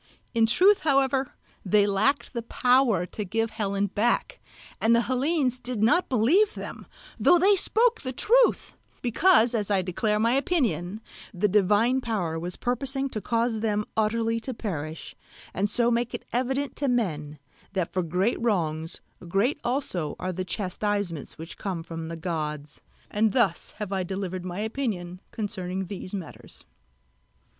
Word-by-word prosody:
In 225 -2 +4
truth 380 - +5
however 275 -3 +1 0.3
they 205 +1 +4
lacked 205 +10 +1
the 235 - -2
power 245 -5 +2
to 210 - -5
give 225 +3 -1
Helen 200 -2 -1
back; 210 +4 0 0.4
and 230 +1 +4
the 235 - +4
Hellenes 260 0 0
did 250 -4 -3
not 340 +11 +3
believe 305 - +3
them, - - -8 0.3
though 355 - +6
they 390 +4 +5
spoke 455 +4 +2
the 255 - -4
truth; 480 - +3 0.3
because, 245 - +4
as 210 -3 -1
I 195 -2 +2
declare 210 +4 0
my 230 +2 +3
opinion, 230 - 0 0.3
the 200 +4 +2
divine 210 +6 +3
power 180 -9 -2
was 175 +2 -4
purposing 270 +2 -1
to 215 - -5
cause 230 0 0
them 210 -1 0
utterly 225 +1 +1
to 250 +2 -5
perish, 160 -8 -5 0.4
and 200 +2 0
so 235 +2 +2
make 235 0 0
it - - -8
evident 265 +3 -1
to 285 - -1
men 155 - -1 0.4
that 185 -4 -2
for 185 - +1
great 180 +8 0
wrongs 165 -8 -1 0.3
great 200 - +1
also 240 - -2
are 185 0 -3
the 185 - -3
chastisements 190 -3 -2
which 165 +2 -9
come 185 -5 -3
from 165 -1 -6
the 165 0 -6
gods. 150 -3 -4 0.3
And 210 0 +2
thus 205 -9 +1
have 210 -2 -5
I 190 - 0
delivered 185 -1 -4
my 180 +2 -4
opinion 210 -7 -3
concerning 190 -4 -3
these 185 0 -6
matters. 190 -6 -8
215 Hz, 155 wpm, -26 LUFS, 185-250 Hz, 0.4 s, though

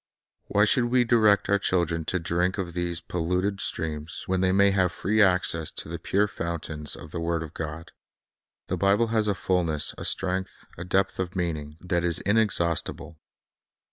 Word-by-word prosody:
Why 105 +1 +3
should 120 +3 +3
we 125 +1 +3
direct 110 -4 +4
our 100 0 +3
children 85 -4 0
to 95 - 0
drink 90 +2 0
of 90 -3 -4
these 85 -1 -2
polluted 90 +4 -1
streams, 80 -2 -1
when 95 0 0
they 95 -1 +3
may 100 +1 +4
have 90 -2 +2
free 110 +4 +1
access 90 -5 +2
to - - -4
the - - -5
pure 100 +2 +1
fountains 80 -4 -4
of 75 - -11
the 85 - -4
word 85 0 -1
of 80 0 -10
God? 80 +1 -6 0.7
The - - -3
Bible 100 +4 +2
has 110 -2 +1
a 100 - +1
fulness, 85 -6 0
a - - -5
strength, 95 0 -2
a 85 - -7
depth 95 +2 0
of 95 0 -3
meaning, 80 -4 -3
that 85 -1 -1
is 85 -2 +3
in 105 +3 +2
exhaustible. 85 -5 -1
90 Hz, 180 wpm, -26 LUFS, 85-100 Hz, 0.7 s, direct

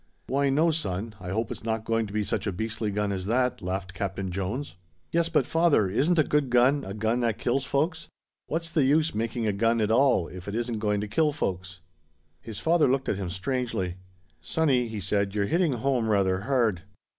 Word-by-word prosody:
"Why 140 +1 +1
no, 155 +5 +3
son, 110 - -3
I 90 -1 -7
hope 110 +4 -2
it's - - -7
not 110 -1 -2
going 115 -1 0
to - - -10
be 105 0 0
such 105 0 -2
a - - 0
beastly 110 +2 -3
gun 105 0 -1
as 95 -1 -3
that," 125 +3 +1
laughed 95 0 -4
Captain 95 -1 -3
Jones. 100 +10 -3 0.4
"Yes, 170 0 +2
but, 155 -6 +2
father, 165 - +3
isn't 145 - +1
a 155 - +5
good 150 -2 +1
gun 125 +4 +4
a 95 - -6
gun 110 +3 0
that 115 -3 0
kills 135 +3 0
folks? 160 +5 -1 0.4
What's 165 +2 -3
the 155 - +2
use 155 +4 +3
making 115 +1 -2
a 105 - +1
gun 115 +3 +2
at 110 0 +1
all 125 -7 +3
if 90 +1 -10
it 100 - -4
isn't 120 -1 -2
going 105 -1 0
to 105 - -3
kill 150 +8 +2
folks?" 95 - -4 0.6
His 110 -2 -8
father 165 -2 +3
looked 130 +1 0
at 100 - 0
him 95 -3 -3
strangely. 105 -3 -2 0.4
"Sonny," 125 - +1
he 110 -2 -5
said, 100 +1 0
"you're 100 -1 +1
hitting 165 - +2
home 125 -2 0
rather 95 -3 +2
hard." 115 -5 +1
115 Hz, 210 wpm, -27 LUFS, 100-135 Hz, 0.6 s, a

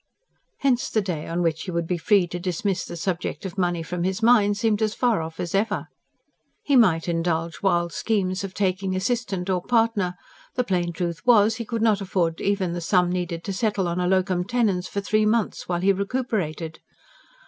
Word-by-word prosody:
Hence 255 -3 +2
the 220 - +1
day 170 -5 -4
on 170 +1 -1
which 165 -1 0
he - - -6
would 170 -1 -1
be 175 +1 -2
free 200 +1 +4
to 175 - -4
dismiss 185 +2 -1
the 170 - -7
subject 180 +2 -3
of 190 - -5
money 175 -3 0
from 175 +1 -4
his 190 +4 -1
mind 210 -4 +5
seemed 215 0 +1
as 215 -1 0
far 235 -8 +2
off 160 0 -7
as 170 - -3
ever. 210 +2 0 0.7
He 285 - +2
might 180 -10 +4
indulge 165 -1 -1
wild 175 -3 +1
schemes 195 -4 -1
of 190 -1 -6
taking 190 -1 0
assistant 195 -3 -1
or 185 -2 0
partner; 225 -4 +1 0.4
the 250 - +1
plain 175 -5 0
truth 170 0 -4
was, 225 -2 +5
he 230 - -4
could 225 0 -2
not 215 -3 +3
afford 180 -4 -1
even 195 -3 0
the 175 - -4
sum 180 +1 +2
needed 175 -2 -3
to 200 - -3
settle 200 -2 0
in 170 +1 -2
a 180 - +1
LOCUM 185 -1 +1
TENENS 200 -5 0
for 200 - -3
three 215 +1 +2
months, 220 -4 0
while 175 -1 0
he 195 +1 +4
recuperated. 195 -7 -2
185 Hz, 200 wpm, -24 LUFS, 175-215 Hz, 0.7 s, mind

